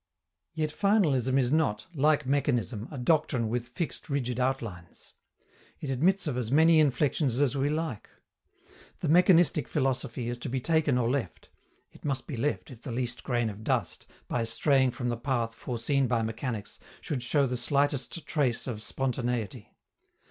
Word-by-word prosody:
Yet 155 -1 -1
finalism 150 - +2
is 125 -2 +2
not, 150 -10 +1
like 150 0 +2
mechanism, 125 -5 0
a 145 - -7
doctrine 130 -4 +1
with 120 +1 -2
fixed 155 +6 -4
rigid 125 -3 -1
outlines. 115 -10 -4 0.7
It 140 - -4
admits 185 +10 +2
of 140 -6 -2
as 120 -2 -2
many 160 +2 +6
inflections 140 -2 +2
as 145 -1 +2
we 140 +1 +1
like. 155 -7 -3 0.9
The - - -1
mechanistic 170 -5 +5
philosophy 130 -4 -1
is 120 0 -3
to 130 - -4
be 130 +1 -1
taken 155 -1 +2
or 120 -2 +1
left: 125 - -3 0.4
it - - -18
must 135 -3 -2
be 145 - -5
left 145 +4 -2
if 120 -3 -12
the 120 - -6
least 120 0 -3
grain 120 -2 0
of 105 0 -7
dust, - - -2 0.2
by 120 - -1
straying 130 +3 +3
from 125 0 -3
the 120 - -1
path 120 -2 -1
foreseen 125 +4 -1
by 115 -2 +1
mechanics, 110 -1 -4 0.2
should 140 -5 -3
show 140 +3 +2
the 125 -1 -2
slightest 140 +3 0
trace 135 -7 0
of 115 -5 -5
spontaneity. 125 -3 -3
130 Hz, 165 wpm, -28 LUFS, 120-145 Hz, 0.9 s, many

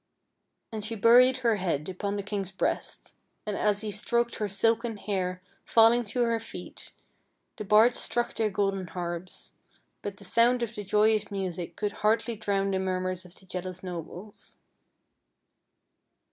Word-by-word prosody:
And 215 -2 -5
she 225 +2 -4
buried 245 +4 +6
her 225 -2 +4
head 165 -6 -1
upon 200 +2 -3
the 200 - -3
king's 200 -2 -3
breast, 195 - -3 0.3
and 210 -1 -2
as 205 0 +1
he 215 -1 -3
stroked 235 +3 0
her 210 - -1
silken 225 +3 +1
hair 185 -3 -3 0.2
falling 230 +1 +5
to 240 +4 0
her 230 -1 +1
feet, 200 -5 -8 0.7
the - - -4
bards 220 +4 +5
struck 240 0 -1
their 220 -1 0
golden 195 -2 -1
harps, 175 0 -6 0.5
but 200 -1 -5
the 200 - -12
sound 235 +4 +3
of 235 -1 -4
the 210 - -6
joyous 210 +1 +2
music 180 -4 -4
could 210 -1 -2
hardly 225 +2 +2
drown 200 -2 0
the 190 - 0
murmurs 185 -1 -2
of 180 +1 -15
the 190 - -16
jealous 185 0 -6
nobles. 180 +3 -8
205 Hz, 155 wpm, -28 LUFS, 185-225 Hz, 0.7 s, buried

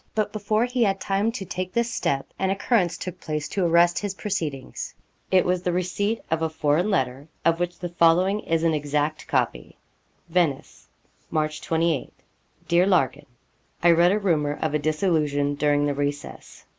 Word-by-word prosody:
But 215 -1 0
before 215 +2 +1
he 250 0 -2
had 195 -3 +2
time 200 +4 0
to 215 -5 -5
take 185 -1 -4
this 235 0 0
step, 135 -9 -1
an 190 - +1
occurrence 195 -2 +1
took 185 -1 -6
place 150 -1 -3
to 195 - -1
arrest 170 +1 +4
his 205 -1 -4
proceedings. 160 -11 -4 0.3
It 185 -1 +4
was 180 0 +1
the 180 - -1
receipt 185 +5 -1
of 160 0 +1
a 160 - +1
foreign 155 +4 +1
letter, 135 -4 -1 0.2
of 165 0 +3
which 175 0 -2
the 175 0 -5
following 175 +4 +3
is 165 -4 -1
an 165 -1 +3
exact 150 +1 -1
copy: - - -1 0.5
'VENICE: 165 -5 -1 0.4
March 155 -1 -1
28. 165 -3 0 0.6
'DEAR 175 +2 +4
LARKIN, 175 -9 +1 0.6
I 175 - +7
read 170 +2 +5
a 205 - +2
rumour 155 -8 0
of 155 -2 -1
a 150 - +2
dissolution 150 -2 +1
during 145 0 +2
the 145 - 0
recess. 145 +1 -5
170 Hz, 170 wpm, -24 LUFS, 150-190 Hz, 0.6 s, I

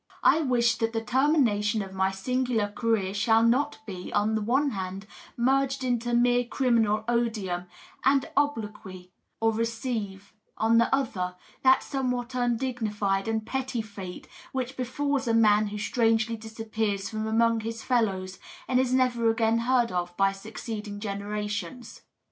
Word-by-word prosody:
I 320 - +5
wish 240 -5 +2
that 225 0 0
the 225 - -1
termination 230 -5 +2
of 190 -1 -10
my 190 0 +1
singular 230 +2 -1
career 210 -3 0
shall 225 +2 +3
not 260 +6 +2
be, 185 -3 -7
on 210 +1 +1
the 220 - 0
one 270 +6 +1
hand, 190 -1 -5 0.3
merged 270 +2 +1
into 240 -1 0
mere 245 +1 +3
criminal 230 -4 +1
odium 215 -7 -1 0.4
and 270 0 +3
obloquy, 210 -10 -2 0.3
or 225 0 +2
receive, 225 -3 -3 0.2
on 225 +1 +4
the 235 - +3
other, 190 -10 -1 0.3
that 260 0 +5
somewhat 250 -2 -2
undignified 230 -5 -1
and 220 -1 -1
petty 260 -2 -2
fate 195 -4 -9 0.2
which 260 0 -3
be&Us 270 +1 -1
a 230 - +2
man 215 -1 +4
who 205 +1 -5
strangely 225 +1 +1
disappears 220 -2 -3
from 215 0 -3
among 230 +1 +3
his 225 +1 -5
fellows 190 -7 0 0.3
and 255 0 +2
is 260 -1 +1
never 250 -3 +2
again 225 0 +2
heard 240 0 +2
of 175 -1 -3
by 195 0 +4
succeeding 210 +1 -7
generations. 205 +1 -5
225 Hz, 145 wpm, -27 LUFS, 205-245 Hz, 0.4 s, I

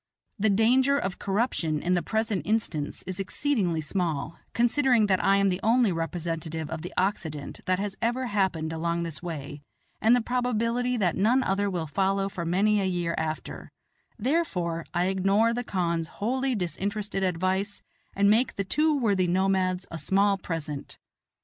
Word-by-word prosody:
The 215 +2 +3
danger 255 +7 +4
of 190 -9 -3
corruption 195 -7 0
in 180 +4 0
the 175 - +2
present 220 +2 -1
instance 205 -9 -2
is 185 0 -5
exceedingly 195 - 0
small, 165 -2 -2
considering 240 -1 +3
that 190 -2 +1
I 195 - +5
am 200 0 +3
the 180 0 -1
only 230 -1 +3
representative 165 -1 -3
of 160 -1 -4
the 175 - -6
Occident 160 -7 -2
that 185 0 +2
has 200 0 -3
ever 240 +3 0
happened 190 -7 0
along 170 +1 -1
this 165 -4 -6
way, 145 -4 -6 0.4
and 225 +3 +6
the - - +3
probability 245 0 0
that 185 -6 +1
none 240 +7 +3
other 200 +1 0
will 175 -4 -2
follow 195 +5 0
for 175 -3 -5
many 200 +5 +2
a - - 0
year 175 -2 -1
after; 160 0 -4 0.5
therefore 205 - -1
I 175 +1 +1
ignore 195 +4 +2
the 245 +1 -2
khan's 170 -6 -1
wholly 260 +7 -1
disinterested 200 +3 -2
advice 190 +3 -1 0.3
and 200 0 +3
make 230 +3 +3
the 200 - -1
two 300 +9 +2
worthy 200 -8 +2
nomads 185 0 +1
a 165 - -5
small 200 +3 +3
present. 160 -6 -5
195 Hz, 160 wpm, -27 LUFS, 170-220 Hz, 0.5 s, and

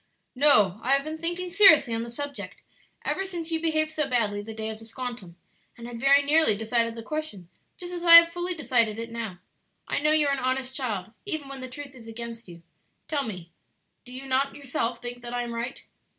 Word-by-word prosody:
"No; 215 -9 +4
I 260 +3 +3
have 275 - +1
been 310 +1 -6
thinking 350 +2 -3
seriously 380 - +6
on 225 - -1
the 235 - -6
subject 285 +4 -7 0.4
ever 385 - -1
since 345 -4 -6
you 325 -1 -1
behaved 310 -1 +1
so 305 -2 -2
badly 215 -5 0
the 215 +2 -9
day 220 0 -4
of 220 0 -7
the 225 - -13
'squantum,' 230 -6 -7 0.4
and 235 - -10
had 240 -1 -7
very 280 +3 +5
nearly 290 -7 +3
decided 230 +1 0
the 230 - -8
question 265 - -6 0.3
just 355 0 -7
as 350 -1 -5
I 335 -1 +9
have 335 0 +9
fully 350 +1 -2
decided 235 -8 +1
it 230 0 -6
now. 225 -6 -5 0.5
I - - -1
know 300 +1 +2
you 310 -1 +4
are 280 - +2
an 275 - -1
honest 260 0 -2
child, 220 -7 -3
even 315 -8 -4
when 270 -1 -7
the 255 - -7
truth 280 +1 -9
is 235 -3 -14
against 230 0 -8
you; 170 -1 -13 0.4
tell 295 -3 -1
me, 180 -6 -7 0.5
do 250 - -14
you 260 +2 -8
not 270 +1 0
yourself 250 -4 -3
think 245 0 -6
that 240 0 -6
I 245 - -1
am 235 -1 -5
right?" 235 +2 -5
255 Hz, 220 wpm, -26 LUFS, 230-310 Hz, 0.5 s, I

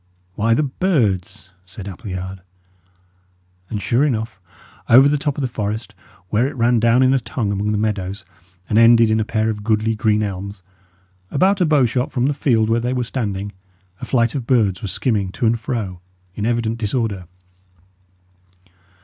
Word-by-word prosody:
"Why, 115 +4 +2
the 155 - +1
birds," 110 - -1
said 95 +1 -10
Appleyard. 95 -2 -6 1.3
And, 105 - -3
sure 120 +6 +1
enough, 110 -7 -2 0.5
over 130 +4 +8
the 145 - +2
top 145 -1 -2
of 145 - -2
the - - +1
forest, 110 -1 -4 0.4
where 115 +5 +2
it 145 - -6
ran 120 -1 +2
down 115 +3 +4
in 130 +1 +4
a 135 - +3
tongue 110 -2 -3
among 100 +1 -1
the 105 - 0
meadows, 100 -2 -2 0.4
and 110 - +2
ended 115 -1 +6
in 110 - +2
a - - +1
pair 110 +1 0
of 105 -1 -7
goodly 110 0 +1
green 105 0 +1
elms, 100 -1 -5 0.7
about 190 +6 +2
a 175 - +3
bowshot 130 -4 +2
from 125 -1 0
the 145 - +1
field 115 -6 +1
where 115 +1 +2
they 125 +2 -1
were 125 -1 -1
standing, 105 -5 -3 0.5
a - - -4
flight 115 -3 +1
of 130 -5 -4
birds 105 -8 +2
was 100 - -4
skimming 100 -3 -1
to - - -2
and 115 +1 +2
fro, 105 -7 -4 0.3
in 105 +3 -3
evident 115 -1 -1
disorder. 105 -5 -2
110 Hz, 175 wpm, -20 LUFS, 105-125 Hz, 1.3 s, over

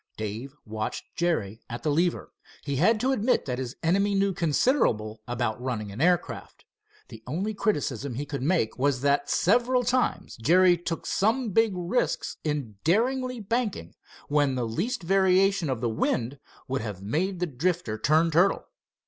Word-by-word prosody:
Dave 110 +6 -5
watched 110 0 -4
Jerry 115 - -1
at 120 +1 -6
the 155 - +1
lever. 170 +4 0 0.3
He 140 -2 -2
had 215 - +3
to 260 +2 +2
admit 250 -1 +1
that 125 -1 -3
his 130 0 -5
enemy 200 +4 +2
knew 195 0 +2
considerable 145 - +1
about 120 -1 -2
running 110 -5 -3
an 105 +7 -6
aircraft. 175 +1 0 0.4
The 110 - -11
only 185 +11 -2
criticism 140 - -1
he 145 +4 -3
could 140 -2 -5
make 140 -6 0
was 135 -1 +1
that 140 +1 +1
several 245 +6 +3
times 250 +1 0
Jerry 175 +9 +5
took 170 -1 -5
some 225 +3 +1
big 225 +1 +3
risks 180 +8 -1
in 145 -9 -3
daringly 250 - +1
banking, 210 - -2 0.3
when 145 -2 +2
the 125 -2 -1
least 195 - -2
variation 190 -1 +3
of 130 -4 -2
the 120 - +1
wind 120 +4 -1 0.3
would 130 -1 -2
have 105 -4 -6
made 175 - -1
the 180 - +1
Drifter 155 -6 -2
turn 160 +3 +3
turtle. 175 +5 +3
160 Hz, 160 wpm, -27 LUFS, 125-195 Hz, 0.4 s, Jerry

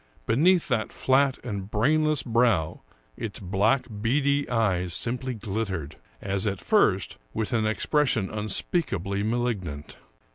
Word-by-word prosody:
Be 115 - +1
neath 175 +5 +4
that 120 -5 -1
flat 135 0 +2
and 100 -4 -4
brainless 150 +7 +2
brow 115 - +1 0.3
its 105 -3 -5
black, 105 +8 +1 0.2
beady 140 +4 +1
eyes 95 -7 0
simply 125 +1 -2
glittered, 100 -8 -4 0.3
as 100 +1 0
at 100 -1 -2
first, 100 - +2 0.2
with 110 +1 -2
an 110 -2 +1
expression 120 -1 +1
unspeakably 100 - -1
malignant. 105 -10 -3
110 Hz, 120 wpm, -26 LUFS, 100-130 Hz, 0.3 s, neath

